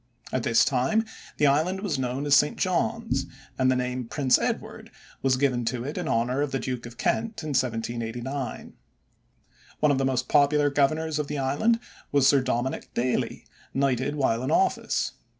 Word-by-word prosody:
At 130 - +1
this 115 0 +3
time 135 - +1 0.3
the 150 - +3
island 160 +7 +2
was 175 -10 -2
known 130 +2 -2
as 145 - +2
St. 145 +1 +4
John's, 225 -4 0 0.3
and 130 -1 +2
the 130 - +3
name 125 0 -2
Prince 135 0 +2
Edward - - -3 0.3
was 130 -1 +2
given 130 -3 +1
to 120 +1 -2
it 145 +4 -5
in - - -3
honor 125 +4 +1
of 145 - 0
the 135 - -1
Duke 125 -1 -4
of 120 0 -13
Kent 225 -5 -1
in 155 - -4
1789. 120 +1 -3 1.1
One 150 - +4
of 135 - +1
the - - +1
most 130 -1 0
popular 145 0 +3
governors 155 +2 +1
of 150 - -2
the 150 - -3
island 145 +13 +1 0.3
was 140 -2 +4
Sir 140 -1 +5
Dominick 130 0 -2
Daly, 125 +1 -1 0.3
knighted 135 +1 +1
while 120 -5 +1
in 130 - -2
office. 380 0 +1
135 Hz, 175 wpm, -26 LUFS, 125-150 Hz, 1.1 s, Sir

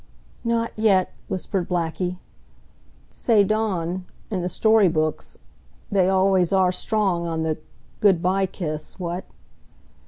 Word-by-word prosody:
"Not 230 -1 0
yet," 200 -4 +2
whispered 190 -2 -3
Blackie. 180 +1 -1 0.9
"Say 220 -4 +3
Dawn 190 -4 -1 0.3
in 190 -3 -1
the 180 - -2
story 220 0 +4
books 155 -2 -1 0.5
they 190 -2 +3
always 190 -2 +3
are 190 -2 +4
strong 185 -4 0
on 160 -1 -2
the 160 -1 -1 0.4
good 195 -5 +4
by 190 +2 +1
kiss, 155 -4 -5
what?" 175 +1 -4
185 Hz, 120 wpm, -23 LUFS, 170-200 Hz, 0.9 s, story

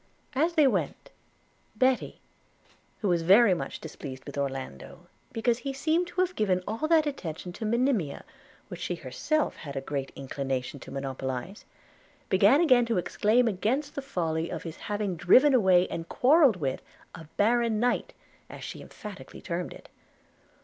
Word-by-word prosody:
As 315 +6 +1
they 310 -3 +5
went, 265 - -1 0.6
Betty, 260 -1 +1 0.8
who 210 - 0
was 175 -2 +2
very 195 +5 +6
much 175 - -4
displeased 135 -4 -8
with - - -8
Orlando, 135 - -5 0.3
because 230 +1 0
he 270 +2 -4
seemed 320 +6 +1
to 355 +1 -1
have 365 0 0
given 185 -4 +1
all 225 +9 -2
that 320 -1 +4
attention 180 - -5
to 220 - -4
Monimia 235 - 0 0.4
which - - -8
she - - -2
had - - -16
herself 310 -1 -1
a 140 -3 -4
great 135 0 -4
inclination 135 0 -4
to - - -11
monopolize, 135 +5 -5 0.6
began 200 - +5
again 255 -8 +4
to 230 - 0
exclaim 220 +6 +2
against 240 +9 -1
the 280 - -4
folly 165 -10 -2
of - - -5
his 165 -1 -7
having 205 -3 -3
driven 260 - +6
away 185 -7 +4
and 165 0 -5
quarrelled 275 - +5
with 140 -7 -3 0.3
a 165 - -10
baron 230 +1 +2
knight, 245 +1 0 0.4
as - - -9
she - - -7
emphatically 210 -3 -10
termed 175 0 -4
it. - - -12
205 Hz, 155 wpm, -28 LUFS, 160-260 Hz, 0.8 s, very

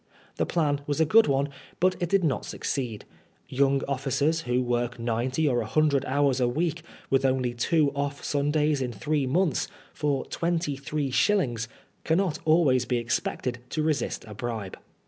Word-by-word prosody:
The - - 0
plan 145 -4 +1
was 145 +1 -1
a 160 - +5
good 220 +8 +5
one, 140 0 +1 0.3
but 185 +1 +3
it 175 - 0
did 195 0 +3
not 145 -6 0
succeed. 120 -6 -4 0.4
Young 135 +1 +2
officers, 140 +4 0
who 125 -2 0
work 120 0 -1
ninety 120 +6 0
or 120 -3 +2
a 110 - -4
hundred 140 +1 +2
hours 140 -1 +2
a 125 - +3
week, 160 +5 -1 0.3
with 135 0 +3
only 130 -2 +1
two 145 +4 +2
off 140 0 -3
Sundays 145 0 +1
in 125 -2 -2
three 145 +5 -1
months, 170 +4 +1 0.3
for 145 -3 -1
twenty 170 -4 -1
three 140 0 -3
shillings, 125 - +1 0.4
cannot 170 0 +1
always 150 -6 +4
be 125 -1 0
expected 120 +1 -2
to 155 - -1
resist 150 -5 -1
a 105 - -8
bribe. 110 -3 -4
140 Hz, 165 wpm, -27 LUFS, 125-155 Hz, 0.4 s, a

